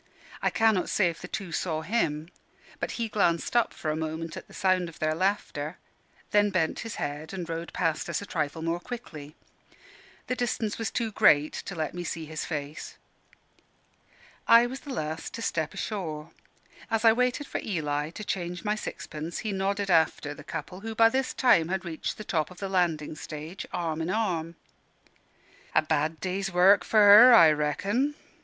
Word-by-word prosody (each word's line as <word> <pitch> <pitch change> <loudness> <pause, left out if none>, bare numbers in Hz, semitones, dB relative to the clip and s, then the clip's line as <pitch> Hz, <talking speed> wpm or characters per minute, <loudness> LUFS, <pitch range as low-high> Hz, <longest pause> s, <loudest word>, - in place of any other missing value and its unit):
I - - +2
cannot 220 -5 +2
say 180 -5 +2
if 165 - -13
the 180 - -7
two 185 -2 -5
saw 160 -1 -2
him: 165 -5 -1 0.5
but - - -3
he 230 -1 -2
glanced 195 -3 0
up 240 -2 +3
for 155 - -3
a - - -2
moment 160 +1 -4
at - - -9
the - - -19
sound 185 -3 +1
of 165 - -14
their 155 0 0
laughter, 165 -3 -1 0.5
then 205 0 +4
bent 175 -5 0
his 225 - -5
head 150 +4 -5
and 175 -3 -5
rowed 165 +1 -5
past 165 -3 -1
us - - -1
a 205 - -7
trifle 160 -3 -3
more 165 +1 -1
quickly. 160 -9 -8 0.9
The 250 - -2
distance 230 -3 -2
was 225 - -1
too 230 -2 -2
great 150 -6 +4
to 195 - -6
let 155 -2 -3
me 175 0 -5
see 165 -1 -4
his 155 0 -5
face. 150 -1 -6 1.5
I 235 +1 +8
was 260 +2 -5
the 285 - -9
last 160 -8 -4
to 230 - -6
step 160 -6 -1
ashore. 165 -7 -5 0.6
As 225 0 0
I 225 - +8
waited 250 +4 0
for - - -4
Eli 150 -6 -2
to 195 +6 -8
change 180 -3 -4
my 210 - +2
sixpence, 165 -6 -6
he 215 - 0
nodded 195 0 -1
after 160 -3 +2
the 155 - -12
couple, 165 +5 -6
who 220 +2 -6
by 225 0 +6
this 265 +2 -1
time 170 -11 +4
had 190 +1 -2
reached 160 -2 -4
the 215 - -6
top 160 -7 -1
of 180 - -14
the 195 0 -4
landing 170 -5 0
stage, 155 +4 -7
arm 165 -2 -2
in 160 - -2
arm. 175 -6 -1 1.2
"A - - +5
bad 155 +1 0
day's 190 +1 -2
work 185 +3 +5
for 220 - 0
her, 215 +5 +10
I 165 -7 +8
reckon." 200 - 0
175 Hz, 185 wpm, -27 LUFS, 155-210 Hz, 1.5 s, her